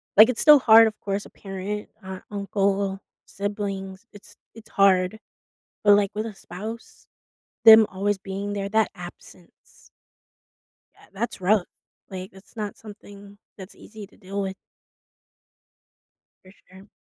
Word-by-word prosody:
like, 215 Hz, +4 st, +8 dB
it's 250 Hz, -, -2 dB
still 300 Hz, -1 st, +8 dB
hard, 225 Hz, -2 st, +7 dB
of 215 Hz, -, -6 dB
course, 200 Hz, 0 st, -4 dB
a -, -, -13 dB
parent, 195 Hz, +1 st, -7 dB
or 190 Hz, -, -11 dB
an 185 Hz, -, -13 dB
uncle, 200 Hz, -1 st, -1 dB, 0.3 s
siblings, 200 Hz, 0 st, -5 dB
it's 205 Hz, -, -16 dB, 0.2 s
it's 225 Hz, -1 st, -15 dB
hard- 195 Hz, +1 st, +2 dB, 0.7 s
but, 205 Hz, -1 st, +7 dB
like, 200 Hz, -1 st, +1 dB
with 215 Hz, +1 st, -3 dB
a 225 Hz, -, -7 dB
spouse, 215 Hz, +6 st, -10 dB, 0.6 s
them 220 Hz, -1 st, +9 dB
always 200 Hz, +1 st, -2 dB
being 195 Hz, +1 st, -6 dB
there, 200 Hz, -1 st, -3 dB
that 220 Hz, +1 st, +1 dB
absence 175 Hz, 0 st, -15 dB, 1.1 s
ah, -, -, -21 dB
that's 205 Hz, 0 st, -5 dB
rough, 190 Hz, 0 st, +2 dB, 0.4 s
like, 185 Hz, 0 st, -7 dB
it's 190 Hz, +4 st, -18 dB
not 210 Hz, -2 st, -5 dB
something 205 Hz, -1 st, -14 dB, 0.2 s
that's 190 Hz, -1 st, -11 dB
easy 215 Hz, -1 st, -12 dB
to -, -, -24 dB
deal 195 Hz, +1 st, -5 dB
with. 190 Hz, -1 st, -4 dB, 1.9 s
For 185 Hz, -, -16 dB, 0.2 s
sure. 190 Hz, +2 st, -15 dB
200 Hz, 140 wpm, -24 LUFS, 190-215 Hz, 1.9 s, them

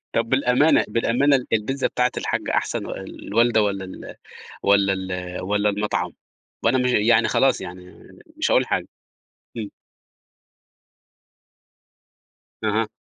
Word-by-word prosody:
طب 115 Hz, 0 st, +1 dB
بالأمانة 130 Hz, +3 st, +3 dB
بالأمانة، 120 Hz, +6 st, +2 dB
ال 125 Hz, -, -5 dB
البيتزا 130 Hz, +5 st, 0 dB
بتاعة 125 Hz, 0 st, +1 dB
الحاجة -, -, -2 dB
أحسن -, -, -1 dB
والوالدة، 115 Hz, 0 st, 0 dB
والَّا 100 Hz, -2 st, -1 dB
ال 95 Hz, -, -9 dB, 0.5 s
والَّا 100 Hz, -1 st, +4 dB
ال 90 Hz, -1 st, -4 dB
والَّا 105 Hz, +2 st, +1 dB
المطعم، 100 Hz, -4 st, -2 dB, 0.5 s
وأنا 125 Hz, +3 st, +3 dB
م 125 Hz, -, +1 dB
يعني 115 Hz, -1 st, +3 dB
خلاص 135 Hz, -1 st, +2 dB
يعني 90 Hz, 0 st, -10 dB, 0.4 s
مش 315 Hz, -, 0 dB
هاقول -, -, +3 dB
حاجة، -, -, -2 dB, 0.7 s
إمم. -, -, -4 dB, 3.0 s
اها. -, -, +1 dB
110 Hz, 115 wpm, -22 LUFS, 100-125 Hz, 3.0 s, والَّا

